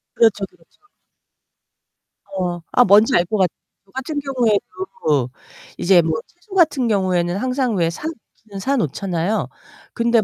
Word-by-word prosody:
그렇죠, 210 -4 +3
그렇죠. 165 - -29 1.5
어. 175 -2 -2
아 245 - +6
뭔지 205 +2 +5
알 175 - +4
것 215 +4 -1
같아. 185 -3 +2 0.3
저 195 - -26
같은 280 +3 -3
경우에도 250 - -1 0.5
이제 175 -1 +5
뭐 160 -1 -1 0.2
채소 380 +3 -13
같은 295 -8 +3
경우에는 185 -3 +1
항상 255 -1 0
왜 165 -2 +2
사 170 - -8
놓기는 220 -8 -10
사 275 +6 0
놓잖아요? 185 - -1 0.5
근데 235 -1 +3
210 Hz, 270 characters per minute, -20 LUFS, 180-255 Hz, 1.5 s, 아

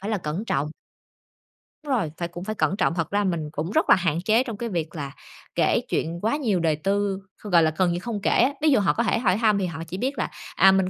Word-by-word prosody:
phải 200 +3 -4
là 215 - 0
cẩn 170 +6 -4
trọng. 145 -7 -1 1.2
Đúng 290 - -5
rồi, 200 -12 0
phải 170 - -2
cũng 175 +1 -8
phải 215 +2 -4
cẩn 195 - +1
trọng, - - +2
thật 165 -3 -1
ra 205 0 +2
mình 165 -5 -1
cũng 160 +5 -3
rất - - +1
là - - +9
hạn 170 -2 0
chế 225 +3 +4
trong 230 -5 -6
cái 235 +1 -3
việc 165 -4 -3
là 140 -3 -5 0.4
kể - - +3
chuyện 170 +2 -1
quá 225 +6 +1
nhiều 220 -10 +1
đời 160 -2 +2
tư, 195 +4 0 0.2
gọi 180 -6 +4
là, 155 -1 +2
gần 185 -2 +3
như 175 - -1
không 215 0 -4
kể - - +1
á, 265 +4 +3
ví 310 - +4
dụ 270 - +5
họ 200 - +2
có 235 - 0
thể 220 - +1
hỏi 195 -5 +2
thăm 215 -2 +3
thì 190 - 0
họ 165 -2 -5
chỉ 180 - -5
biết 265 +7 -2
là, - - -1 0.3
à, 190 - +7
mình 190 -1 +2
190 Hz, 275 wpm, -24 LUFS, 170-215 Hz, 1.2 s, là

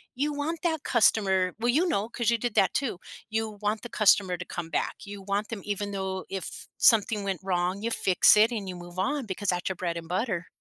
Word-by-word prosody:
you 290 +4 0
want 300 +3 -3
that 320 -4 -1
customer 190 -6 +3
well, 240 - 0
you 310 +9 +3
know, 220 - 0
'cause 235 -1 -1
you 235 - +3
did 235 -1 -3
that 190 - +3
too 265 -9 -1 0.3
you 220 0 -1
want 210 +1 -1
the 240 - -8
customer 195 -4 +3
to 180 - -7
come 170 -2 -6
back, - - -1
you 200 -1 -8
want 200 +2 -2
them 225 -3 -5
even 205 0 -3
though 190 -1 -3
if 190 -4 -5
something 210 -2 +4
went 195 -1 -2
wrong, 185 +1 -1
you 230 - -1
fix 190 +1 +5
it 220 +3 +5
and 200 -4 -4
you 180 - -5
move 175 0 -11
on 280 +7 -1
because 200 0 -3
that's 180 -1 -1
your 190 - -1
bread 170 -1 -3
and 165 -1 -7
butter. 180 -1 -2
205 Hz, 230 wpm, -27 LUFS, 185-230 Hz, 0.3 s, fix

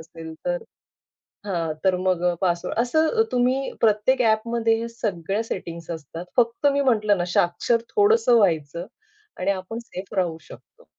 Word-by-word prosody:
असेल 160 0 -10
तर - - -1 0.8
हां, 170 -5 -1
तर 185 -1 +3
मग 185 -1 0
अ, 175 - -2
पासवर्ड 175 +2 -1
असं 315 +7 +2
अ, - - +8
तुम्ही 255 +2 +1
प्रत्येक 220 +4 +3
ॲपमध्ये 225 0 +2
ह्या 230 - -4
सगळ्या 205 -3 -2
सेटिंग्ज 170 -5 -6
असतात. 165 +1 -7
फक्त 235 +3 +2
मी 280 - +1
म्हटलं 215 -7 +2
ना 175 - 0
साक्षर 175 +7 +2
थोडंसं 415 - +4
व्हायचं 170 -4 +1 0.5
आणि 185 +2 0
आपण 195 +4 -4
सेफ 185 +2 -7
राहू 175 -4 0
शकतो. - - -16
205 Hz, 155 wpm, -23 LUFS, 175-235 Hz, 0.8 s, अ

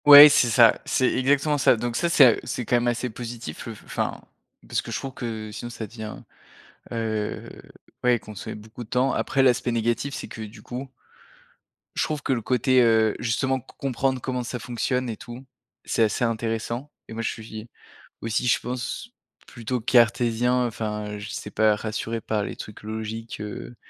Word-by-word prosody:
Ouais, 145 +1 +13
c'est 125 -4 +4
ça, 115 0 +6
c'est 130 - +2
exactement 145 +3 +2
ça, 125 - +5
donc 120 +1 -3
ça, 170 +7 +1
c'est 150 -5 +8
a 120 - +8
heu, - - -5
c'est 120 0 -4
quand 120 - +2
même 120 0 0
assez 120 0 -1
positif, 115 -7 -7
le - - -6
f - - -14
f - - -21
enfin, - - -2 0.5
parce - - 0
que - - -8
je - - -1
trouve 135 -1 -6
que 110 -4 -5
sinon 120 +3 -6
ça 115 -2 -6
devient, 110 0 -7 0.8
heu, 110 -2 -2 0.6
ouais, 125 -1 +4
consommer 105 -3 -8
beaucoup 110 +3 -9
de 110 - -20
temps. 130 +1 +2
Après 135 - +1
l'aspect 125 -1 +3
négatif, 120 +4 0
c'est - - -6
que 110 - -7
du 110 +2 -9
coup 125 +2 -6 1.1
je - - +1
trouve 150 -2 -2
que - - -2
le 120 - -1
côté, 130 +2 +3
heu, 110 -2 +4
justement 130 +3 0
c - - -18
comprendre 130 -1 0
comment 125 -1 -2
ça 125 +1 -4
fonctionne 125 +2 -1
et 110 - -4
tout, 120 +2 -10 0.4
c'est 115 - +1
assez 110 +2 +1
intéressant 115 +3 -2 0.2
et - - -7
moi 115 - -3
je 115 - 0
suis, 110 0 -8 0.5
aussi 115 +2 -1
je 120 - +4
pense 125 - -4 0.4
plutôt 120 0 -3
cartésien, 120 +1 +3
enfin 105 -2 -3
je 105 +1 -7
sais - - -6
pas, 110 -1 +4
rassuré 110 +2 -3
par 105 -1 -1
les - - -5
trucs 105 - -10
logiques, 110 +1 -5
heu, 105 +3 -7
120 Hz, 195 wpm, -25 LUFS, 110-125 Hz, 1.1 s, Ouais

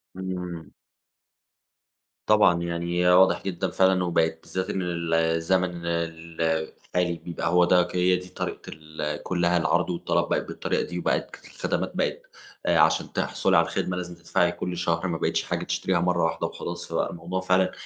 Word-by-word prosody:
إمم. 90 -3 -5 1.5
طبعًا، 105 -5 +4
يعني 85 +1 -1
واضح 95 +1 +5
جدًا 95 -3 -2
فعلًا 95 -1 +3
وبقت 80 -2 +1
بالذات 95 +1 -4
إن 95 - -1
ال 85 -2 -2
الزمن 85 +2 +1
ال 85 -1 -3 0.5
الحالي 90 -1 0
بيبقى 85 0 -4
هو 90 0 +5
ده 90 0 +5
ك 90 - -8
هي 90 0 +4
دي 90 0 -6
طريقة - - -5
ال 75 -1 -5
كُلّها 85 -1 +1
العرض 85 +2 +1
والطلب 85 -1 0
بقت - - 0
بالطريقة - - -1
دي 90 0 -5
وبقت - - -1 0.2
الخدمات - - -2
بقت - - -1 0.4
آآ - - +3
عشان - - +3
تحصُلي - - +1
على - - +4
الخدمة 90 0 -2
لازم 90 -1 -5
تدفعي 85 +1 +1
كل 90 0 -4
شهر، 85 0 0
ما 85 -2 -2
بقيتش - - 0
حاجة - - -2
تشتريها 95 -2 0
مرة 90 -1 +1
واحدة 80 0 0
وخلاص، 85 0 -6
فبقي 80 - -1
الموضوع 90 +2 -4
فعلًا 95 0 +2
85 Hz, 165 wpm, -26 LUFS, 85-90 Hz, 1.5 s, واضح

